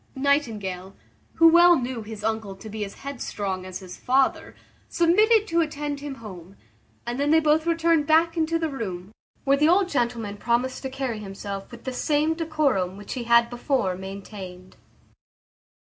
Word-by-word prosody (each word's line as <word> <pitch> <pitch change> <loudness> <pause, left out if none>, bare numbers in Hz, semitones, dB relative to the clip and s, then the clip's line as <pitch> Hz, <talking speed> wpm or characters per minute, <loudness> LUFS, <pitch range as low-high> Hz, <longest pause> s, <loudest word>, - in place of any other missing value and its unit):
Nightingale, 215 -10 -1 0.4
who 330 - +7
well 345 +1 +7
knew 250 -3 -3
his 215 -1 -9
uncle 220 -3 -2
to 215 +3 -11
be 215 0 -4
as 200 - -7
headstrong 200 -8 -4
as 185 - -6
his 185 -1 -10
father, 265 +1 +1 0.3
submitted 425 +6 +4
to 335 0 +2
attend 295 -2 -3
him 285 -1 -6
home, 195 -5 -11 0.5
and 240 +2 -4
then 285 +1 +1
they 320 +1 +6
both 310 +1 +2
returned 330 -2 +2
back 330 +2 +4
into 330 0 +1
the 325 -1 -1
room, 190 -7 -5 0.3
where 275 0 +3
the 300 +2 +4
old 370 +1 +3
gentleman 235 - -2
promised 240 +4 -1
to 265 - -4
carry 260 -4 -3
himself 195 -1 -7
with 235 -1 -12
the 260 - -4
same 300 +4 +1
decorum 300 - 0
which 205 - -7
he 245 -3 -5
had 235 0 +5
before 240 -5 -1
maintained. 190 -1 -9
250 Hz, 165 wpm, -25 LUFS, 200-310 Hz, 0.5 s, who